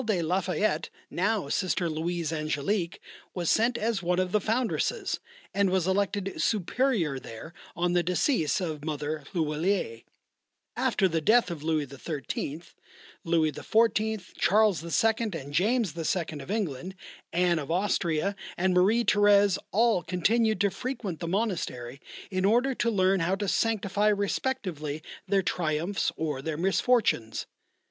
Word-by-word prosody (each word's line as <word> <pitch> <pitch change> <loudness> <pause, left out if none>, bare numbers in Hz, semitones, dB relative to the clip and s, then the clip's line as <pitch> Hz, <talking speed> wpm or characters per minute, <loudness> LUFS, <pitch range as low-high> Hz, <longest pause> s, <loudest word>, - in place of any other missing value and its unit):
de 215 -6 0
la 175 +3 +1
Fayette, 180 -3 0 0.2
now 200 -2 0
Sister 180 +3 0
Louise 165 0 -2
Angélique, 160 +4 -1 0.4
was 175 -3 +1
sent 235 +2 +2
as 220 -3 -1
one 180 0 0
of 185 -1 0
the 210 - +2
foundresses, 255 - -1 0.3
and 200 -1 +2
was 185 -2 +1
elected 195 0 0
Superior 210 - +1
there 125 +7 -10 0.2
on 175 0 0
the 175 - +4
decease 175 - +1
of 155 -5 -4
Mother 150 -1 -3
L'huillier. 155 - 0 0.7
After 190 - +2
the 165 -2 -1
death 220 +3 +4
of 165 -4 -6
Louis 155 -1 0
XIII., 140 +2 -5 0.6
Louis 165 -2 +2
XIV., 220 +2 0
Charles 205 -4 +3
II., 225 +7 +2 0.3
and 140 +1 -10
James 205 +1 +1
II. 165 -1 -2
of 135 - -10
England, 190 - -3 0.4
Anne 175 -1 +2
of 140 - -6
Austria, 180 0 0 0.2
and 185 +1 +2
Marie 210 +6 +3
Thérèse, 205 -2 +4
all 225 -2 +3
continued 215 +5 +1
to 200 -1 +3
frequent 240 -9 -4
the 170 - -4
monastery 165 - -2 0.3
in 185 -1 -1
order 240 +7 +3
to 240 -1 0
learn 190 -2 +3
how 180 +3 +1
to 200 +1 -3
sanctify 205 -1 +1
respectively 195 - -1 0.2
their 195 0 +2
triumphs 170 +3 -1
or 150 -4 -2
their 155 +1 -3
misfortunes. 190 - +1
185 Hz, 140 wpm, -28 LUFS, 160-210 Hz, 0.7 s, the